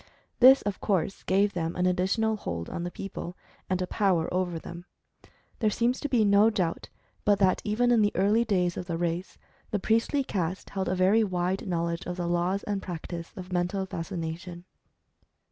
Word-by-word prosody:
This 260 Hz, +2 st, +8 dB
of 205 Hz, -2 st, -3 dB
course 195 Hz, -2 st, 0 dB
gave 200 Hz, +2 st, +2 dB
them 165 Hz, -1 st, -2 dB
an 180 Hz, -, 0 dB
additional 195 Hz, +5 st, +1 dB
hold 85 Hz, -, -5 dB
on -, -, -4 dB
the 175 Hz, -, -3 dB
people, 180 Hz, 0 st, -7 dB, 0.3 s
and 185 Hz, -1 st, +1 dB
a -, -, -1 dB
power 180 Hz, -4 st, +1 dB
over 180 Hz, -2 st, 0 dB
them. 170 Hz, +2 st, -9 dB, 0.7 s
There 220 Hz, -, +3 dB
seems 240 Hz, +4 st, 0 dB
to 290 Hz, -, -3 dB
be 235 Hz, -5 st, +3 dB
no 200 Hz, +2 st, +5 dB
doubt 180 Hz, -6 st, -2 dB, 0.3 s
but 205 Hz, -1 st, +4 dB
that 190 Hz, -2 st, +3 dB
even 235 Hz, +4 st, +1 dB
in 235 Hz, -2 st, +5 dB
the 205 Hz, 0 st, +3 dB
early 205 Hz, +5 st, +3 dB
days 180 Hz, -6 st, 0 dB
of 180 Hz, -, -5 dB
the 170 Hz, -2 st, -2 dB
race, 175 Hz, +2 st, -3 dB, 0.3 s
the 210 Hz, -, 0 dB
priestly 230 Hz, +7 st, +1 dB
caste 185 Hz, -6 st, -3 dB
held 190 Hz, -2 st, -2 dB
a 185 Hz, -, 0 dB
very 190 Hz, +5 st, +4 dB
wide 185 Hz, 0 st, -1 dB
knowledge 170 Hz, -1 st, -2 dB
of 180 Hz, 0 st, -4 dB
the 175 Hz, -, -2 dB
laws 175 Hz, +3 st, 0 dB
and 200 Hz, -2 st, -2 dB
practice 170 Hz, -1 st, -6 dB
of 185 Hz, 0 st, -7 dB
Mental 180 Hz, +2 st, 0 dB
Fascination. 170 Hz, 0 st, -5 dB
185 Hz, 185 wpm, -28 LUFS, 175-205 Hz, 0.7 s, This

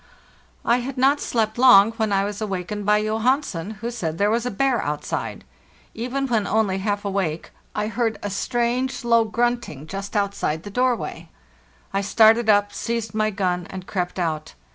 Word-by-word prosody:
I 235 Hz, -, +4 dB
had 255 Hz, +2 st, -5 dB
not 275 Hz, +3 st, +3 dB
slept 220 Hz, -1 st, -1 dB
long, 225 Hz, -5 st, +7 dB
when 220 Hz, -2 st, -1 dB
I 195 Hz, 0 st, +2 dB
was 205 Hz, +1 st, -4 dB
awakened 200 Hz, 0 st, -4 dB
by 210 Hz, 0 st, +5 dB
Johan. 225 Hz, +7 st, +1 dB
sen, 175 Hz, -, -5 dB
who 235 Hz, +1 st, -3 dB
said 165 Hz, -9 st, -3 dB
there 205 Hz, +3 st, +2 dB
was 235 Hz, +2 st, 0 dB
a -, -, 0 dB
bear 250 Hz, +2 st, +1 dB
outside. 150 Hz, 0 st, -4 dB, 0.5 s
Even 255 Hz, +4 st, -2 dB
when 225 Hz, -6 st, 0 dB
only 205 Hz, -3 st, +1 dB
half 205 Hz, +1 st, -2 dB
awake, 190 Hz, -5 st, -2 dB, 0.2 s
I 210 Hz, -, 0 dB
heard 225 Hz, +1 st, -1 dB
a 205 Hz, -, -3 dB
strange, 240 Hz, +5 st, -1 dB
low 230 Hz, -1 st, +4 dB
grunting 235 Hz, -, -1 dB
just 195 Hz, +5 st, -6 dB
outside 200 Hz, -6 st, -1 dB
the 205 Hz, -, -8 dB
doorway. 250 Hz, +2 st, -1 dB, 0.6 s
I 195 Hz, -, +1 dB
started 220 Hz, +2 st, +4 dB
up, 205 Hz, -1 st, +4 dB
seized 230 Hz, -3 st, -3 dB
my 215 Hz, 0 st, +1 dB
gun, 180 Hz, -4 st, -1 dB
and 185 Hz, -1 st, -7 dB
crept 180 Hz, -3 st, -3 dB
out. 160 Hz, -3 st, -3 dB
215 Hz, 175 wpm, -23 LUFS, 195-235 Hz, 0.6 s, long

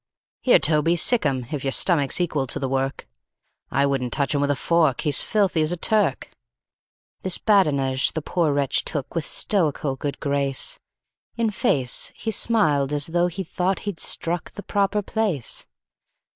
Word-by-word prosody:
"Here, 255 Hz, -, +5 dB
Toby, 155 Hz, +2 st, +2 dB
sic 230 Hz, +7 st, +3 dB
'em, 130 Hz, -2 st, -2 dB
if 145 Hz, -4 st, -4 dB
your 135 Hz, -, -1 dB
stomach's 145 Hz, -2 st, +2 dB
equal 155 Hz, -6 st, -1 dB
to -, -, -3 dB
the 135 Hz, -, -3 dB
work 135 Hz, +1 st, -3 dB, 0.6 s
I 140 Hz, +1 st, +1 dB
wouldn't 135 Hz, -3 st, -1 dB
touch 140 Hz, +3 st, 0 dB
him 145 Hz, -, 0 dB
with 145 Hz, -, 0 dB
a 145 Hz, -, +1 dB
fork, 160 Hz, -2 st, +1 dB
he's 145 Hz, -5 st, +1 dB
filthy 195 Hz, -6 st, 0 dB
as 155 Hz, +1 st, +2 dB
a 175 Hz, -, -1 dB
Turk." 205 Hz, -5 st, 0 dB, 0.9 s
This 185 Hz, -2 st, +1 dB
badinage 140 Hz, -10 st, +2 dB
the 160 Hz, -, -3 dB
poor 165 Hz, -2 st, 0 dB
wretch 140 Hz, -1 st, 0 dB
took 145 Hz, -4 st, -4 dB
with 165 Hz, -3 st, -2 dB
stoical 150 Hz, -8 st, +1 dB
good 140 Hz, +1 st, -5 dB
grace; 140 Hz, -, -1 dB, 0.6 s
In 230 Hz, -2 st, 0 dB
face, 130 Hz, -9 st, 0 dB
he 225 Hz, -, -4 dB
smiled 155 Hz, -12 st, +2 dB
as 145 Hz, -1 st, +2 dB
tho' 175 Hz, +1 st, +1 dB
he 180 Hz, +2 st, -5 dB
thought 185 Hz, +2 st, -2 dB
he'd 205 Hz, -5 st, -4 dB
struck 170 Hz, 0 st, 0 dB
the 205 Hz, -, -10 dB
proper 205 Hz, 0 st, 0 dB
place. 190 Hz, -, -1 dB
155 Hz, 170 wpm, -23 LUFS, 140-185 Hz, 0.9 s, Here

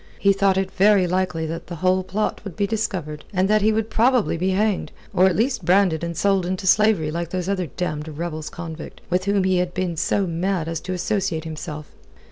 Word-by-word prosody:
He 200 Hz, 0 st, +4 dB
thought 195 Hz, -1 st, +2 dB
it 190 Hz, 0 st, -1 dB
very 195 Hz, -1 st, +4 dB
likely 180 Hz, -2 st, -1 dB
that 165 Hz, +1 st, -5 dB
the 175 Hz, -, -6 dB
whole 185 Hz, +3 st, +2 dB
plot 195 Hz, +3 st, -2 dB
would 195 Hz, -5 st, -7 dB
be 200 Hz, -, +2 dB
discovered, 190 Hz, -8 st, -3 dB
and 190 Hz, -1 st, +1 dB
that 215 Hz, +1 st, +3 dB
he 215 Hz, +2 st, +4 dB
would 220 Hz, 0 st, -1 dB
probably 245 Hz, -3 st, +3 dB
be 180 Hz, +3 st, 0 dB
hanged, 205 Hz, +1 st, 0 dB, 0.2 s
or 185 Hz, +1 st, +5 dB
at 185 Hz, -, +1 dB
least 245 Hz, +2 st, 0 dB
branded 180 Hz, -3 st, +3 dB
and 170 Hz, -1 st, -4 dB
sold 195 Hz, 0 st, +2 dB
into 185 Hz, +2 st, -3 dB
slavery 200 Hz, -5 st, +3 dB
like 170 Hz, +1 st, -3 dB
those 180 Hz, 0 st, -3 dB
other 190 Hz, -3 st, -1 dB
damned 150 Hz, 0 st, -4 dB
rebels 155 Hz, 0 st, -5 dB
convict, 165 Hz, -2 st, -8 dB
with 185 Hz, +1 st, +1 dB
whom 200 Hz, -1 st, +2 dB
he 185 Hz, -1 st, +2 dB
had 180 Hz, 0 st, -1 dB
been 185 Hz, -2 st, -1 dB
so 195 Hz, +5 st, +1 dB
mad 175 Hz, 0 st, -1 dB
as 165 Hz, -1 st, -2 dB
to 185 Hz, -, -5 dB
associate 180 Hz, -2 st, -1 dB
himself. 155 Hz, -1 st, -7 dB
185 Hz, 215 wpm, -22 LUFS, 165-200 Hz, 0.2 s, or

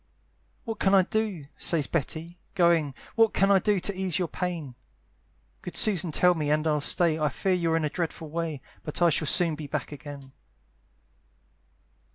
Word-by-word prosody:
"What 225 Hz, -2 st, -5 dB
can 195 Hz, 0 st, +3 dB
I 190 Hz, -, +6 dB
do?" 210 Hz, -5 st, -2 dB, 0.2 s
says 160 Hz, -4 st, +1 dB
Betty, 165 Hz, +3 st, -4 dB, 0.2 s
going, 165 Hz, -6 st, +3 dB, 0.2 s
"What 225 Hz, -1 st, +3 dB
can 195 Hz, +1 st, +3 dB
I 195 Hz, -, +6 dB
do 205 Hz, 0 st, +1 dB
to 200 Hz, -, -1 dB
ease 185 Hz, -3 st, -1 dB
your 180 Hz, -2 st, -1 dB
pain? 165 Hz, -7 st, -4 dB, 0.9 s
"Good 180 Hz, -, -5 dB
Susan 185 Hz, -6 st, +3 dB
tell 180 Hz, +4 st, +4 dB
me, 155 Hz, -3 st, -2 dB
and 155 Hz, +1 st, +1 dB
I'll 150 Hz, -2 st, +1 dB
stay; 160 Hz, +1 st, +2 dB
"I 150 Hz, -1 st, +1 dB
fear 190 Hz, +7 st, -1 dB
you're 165 Hz, -2 st, +1 dB
in 160 Hz, -, 0 dB
a -, -, 0 dB
dreadful 165 Hz, -2 st, -4 dB
way, 160 Hz, -4 st, -3 dB, 0.2 s
"But 150 Hz, -, -4 dB
I 170 Hz, -, +5 dB
shall 155 Hz, 0 st, 0 dB
soon 170 Hz, +1 st, +3 dB
be 150 Hz, -1 st, -6 dB
back -, -, -4 dB
again." 140 Hz, -1 st, -9 dB
165 Hz, 180 wpm, -27 LUFS, 150-185 Hz, 0.9 s, I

